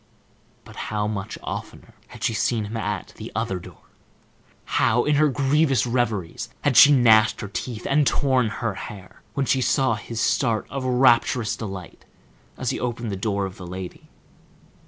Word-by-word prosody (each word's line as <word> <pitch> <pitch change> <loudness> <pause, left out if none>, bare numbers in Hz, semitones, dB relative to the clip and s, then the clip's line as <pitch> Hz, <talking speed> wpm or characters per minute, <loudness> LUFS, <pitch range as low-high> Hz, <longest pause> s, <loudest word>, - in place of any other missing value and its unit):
But - - -13
how 105 -1 -1
much 105 0 -4
oftener - - -7
had - - -11
she - - +1
seen 110 +1 0
him 105 +3 -7
at 105 -3 -3
the - - -8
other 95 - -1
door! - - -14 0.8
How 120 +2 +2
in 150 - +2
her 155 +1 +5
grievous 140 0 +2
reveries 115 -5 -2
had 145 -3 +1
she 145 - +9
gnashed 115 -5 +5
her 100 - -4
teeth, 110 +3 -5
and 145 0 +3
torn 130 -4 +2
her 115 0 -3
hair, 95 -1 -10
when 140 - 0
she 130 0 +2
saw 130 -1 +2
his 110 +1 -5
start 115 -3 +1
of 135 -1 -3
rapturous 125 -2 +3
delight 95 -5 -8 0.5
as - - -1
he - - -3
opened 120 -2 -3
the - - -2
door 100 0 -1
of 95 -1 -8
the 90 - -9
lady! 90 0 -8
115 Hz, 170 wpm, -23 LUFS, 105-130 Hz, 0.8 s, she